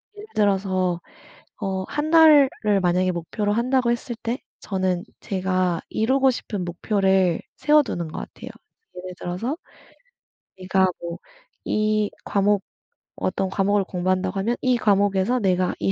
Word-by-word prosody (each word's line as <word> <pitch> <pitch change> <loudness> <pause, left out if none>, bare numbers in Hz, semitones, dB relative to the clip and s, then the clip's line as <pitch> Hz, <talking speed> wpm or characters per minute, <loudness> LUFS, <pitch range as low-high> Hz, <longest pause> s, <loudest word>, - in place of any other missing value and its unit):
예를 420 +1 -10
들어서 190 -3 +1 0.6
어 190 -1 -2
1 300 +1 -2
달을 310 -4 +7 0.3
만약에 180 +1 +2
목표로 205 +5 -2
한다고 245 +2 +1
했을 240 0 -2
때 235 +3 -2 0.2
저는 185 -2 -1 0.2
제가 185 -3 0
이루고 265 +4 +2
싶은 205 -6 -4
목표를 190 0 +1 0.2
세워두는 290 - +2
것 155 - -7
같아요. - - -9 0.5
예를 180 0 -7
들어서 225 - -3 1.0
내가 190 0 +2
뭐 170 0 -5 0.5
이 215 -1 +1
과목 200 0 +1 0.5
어떤 190 0 -1
과목을 200 +1 +1
공부한다고 185 +1 -1
하면 230 +5 0
'이 255 -2 +2
과목에서 205 +2 +2
내가 185 -3 +1
이 100 -1 +1
195 Hz, 270 characters per minute, -23 LUFS, 185-235 Hz, 1.0 s, 달을